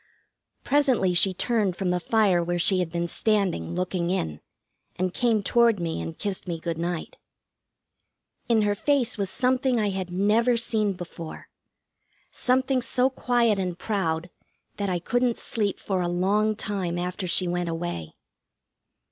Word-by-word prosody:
Presently 265 Hz, -10 st, +2 dB
she 185 Hz, +2 st, +5 dB
turned 200 Hz, 0 st, 0 dB
from 185 Hz, -1 st, -1 dB
the 180 Hz, -, +1 dB
fire 195 Hz, -3 st, +2 dB
where 175 Hz, +1 st, -1 dB
she 185 Hz, +2 st, +4 dB
had 175 Hz, -3 st, -1 dB
been 170 Hz, 0 st, -1 dB
standing, 195 Hz, -, 0 dB
looking 180 Hz, -1 st, -1 dB
in, 80 Hz, -, -2 dB, 0.5 s
and 185 Hz, 0 st, -1 dB
came 230 Hz, -4 st, +1 dB
toward 235 Hz, -1 st, +3 dB
me 165 Hz, -, -2 dB
and 80 Hz, 0 st, -6 dB
kissed 200 Hz, -3 st, -3 dB
me 170 Hz, -2 st, -3 dB
good 165 Hz, -1 st, -4 dB
night. 170 Hz, -1 st, -4 dB, 1.3 s
In 225 Hz, -2 st, +4 dB
her 205 Hz, 0 st, +2 dB
face 250 Hz, +3 st, +1 dB
was 200 Hz, -3 st, -2 dB
something 255 Hz, 0 st, +1 dB
I 210 Hz, -2 st, +1 dB
had 190 Hz, -2 st, -4 dB
never 215 Hz, +6 st, +2 dB
seen 220 Hz, -3 st, 0 dB
before 175 Hz, -3 st, -9 dB, 0.8 s
something 260 Hz, +1 st, +1 dB
so 250 Hz, +2 st, +1 dB
quiet 240 Hz, -5 st, +1 dB
and 180 Hz, -2 st, -2 dB
proud 175 Hz, -5 st, -2 dB, 0.5 s
that 200 Hz, -1 st, -1 dB
I 180 Hz, -, 0 dB
couldn't 240 Hz, +7 st, 0 dB
sleep 205 Hz, -4 st, -2 dB
for 190 Hz, -2 st, -1 dB
a 175 Hz, -, 0 dB
long 205 Hz, +5 st, +1 dB
time 190 Hz, -5 st, -2 dB
after 180 Hz, +2 st, -3 dB
she 180 Hz, +1 st, +3 dB
went 175 Hz, 0 st, -1 dB
away. 165 Hz, -, -4 dB
190 Hz, 155 wpm, -25 LUFS, 175-225 Hz, 1.3 s, she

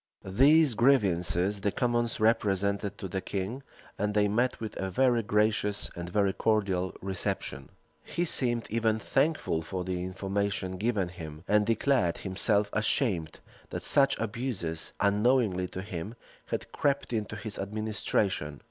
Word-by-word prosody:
These 140 Hz, +8 st, +5 dB
grievances 100 Hz, -5 st, +2 dB
the 100 Hz, -, +1 dB
commons 120 Hz, 0 st, 0 dB
represented 100 Hz, -2 st, +1 dB
to 95 Hz, -, -5 dB
the 95 Hz, +1 st, -3 dB
king 100 Hz, +8 st, -4 dB, 0.4 s
and 105 Hz, +1 st, -1 dB
they 105 Hz, -1 st, +4 dB
met 120 Hz, +5 st, +1 dB
with 110 Hz, -2 st, -5 dB
a 95 Hz, -, -2 dB
very 120 Hz, +4 st, +3 dB
gracious 105 Hz, -1 st, +1 dB
and 85 Hz, 0 st, -5 dB
very 100 Hz, +1 st, +2 dB
cordial 95 Hz, -5 st, 0 dB
reception. 85 Hz, -8 st, -3 dB, 0.3 s
He 175 Hz, -, -2 dB
seemed 120 Hz, -7 st, +1 dB
even 110 Hz, -1 st, +2 dB
thankful 125 Hz, -, 0 dB
for 90 Hz, +3 st, -4 dB
the 90 Hz, -1 st, -3 dB
information 95 Hz, 0 st, -2 dB
given 105 Hz, -3 st, 0 dB
him; 80 Hz, -3 st, -9 dB
and 105 Hz, 0 st, +3 dB
declared 115 Hz, -6 st, +2 dB
himself 100 Hz, +2 st, 0 dB
ashamed 105 Hz, -, 0 dB, 0.3 s
that -, -, -4 dB
such 140 Hz, -1 st, +3 dB
abuses, 110 Hz, -8 st, -3 dB
unknowingly 105 Hz, -2 st, +2 dB
to 95 Hz, +1 st, -6 dB
him, 100 Hz, +3 st, -6 dB, 0.3 s
had -, -, -4 dB
crept 140 Hz, -3 st, 0 dB
into 105 Hz, -1 st, -2 dB
his 105 Hz, 0 st, -6 dB
administration. 100 Hz, -7 st, -1 dB
105 Hz, 140 wpm, -29 LUFS, 95-115 Hz, 0.4 s, These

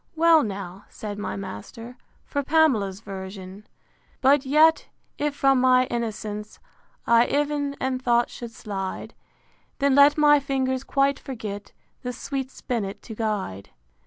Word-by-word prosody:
Well, 325 Hz, 0 st, +5 dB
now, 195 Hz, -3 st, -6 dB
said 205 Hz, -1 st, -7 dB
my -, -, -4 dB
master, 215 Hz, +5 st, -8 dB, 0.3 s
for 285 Hz, -, -2 dB
Pamela's 260 Hz, -11 st, +2 dB
version: 190 Hz, -2 st, -8 dB
V. 210 Hz, -, -18 dB, 0.5 s
But 275 Hz, +1 st, +4 dB
yet, 310 Hz, +3 st, +4 dB, 0.3 s
if 295 Hz, -1 st, -1 dB
from 270 Hz, -2 st, +3 dB
my 255 Hz, 0 st, +5 dB
innocence 215 Hz, -3 st, -4 dB, 0.5 s
I 235 Hz, +1 st, +5 dB
ev'n 290 Hz, -1 st, -1 dB
in 260 Hz, -1 st, -1 dB
thought 240 Hz, -1 st, +2 dB
should 235 Hz, -, -7 dB
slide, 195 Hz, -4 st, -6 dB, 0.6 s
Then 280 Hz, -1 st, +2 dB
let 285 Hz, +2 st, +6 dB
my 295 Hz, -1 st, +6 dB
fingers 265 Hz, -1 st, -1 dB
quite 275 Hz, 0 st, +1 dB
forget 210 Hz, -6 st, -7 dB, 0.3 s
The 250 Hz, 0 st, -4 dB
sweet 265 Hz, 0 st, -4 dB
spinnet 220 Hz, -7 st, -4 dB
to 225 Hz, -, -8 dB
guide. 205 Hz, -, -3 dB
245 Hz, 135 wpm, -24 LUFS, 205-280 Hz, 0.6 s, let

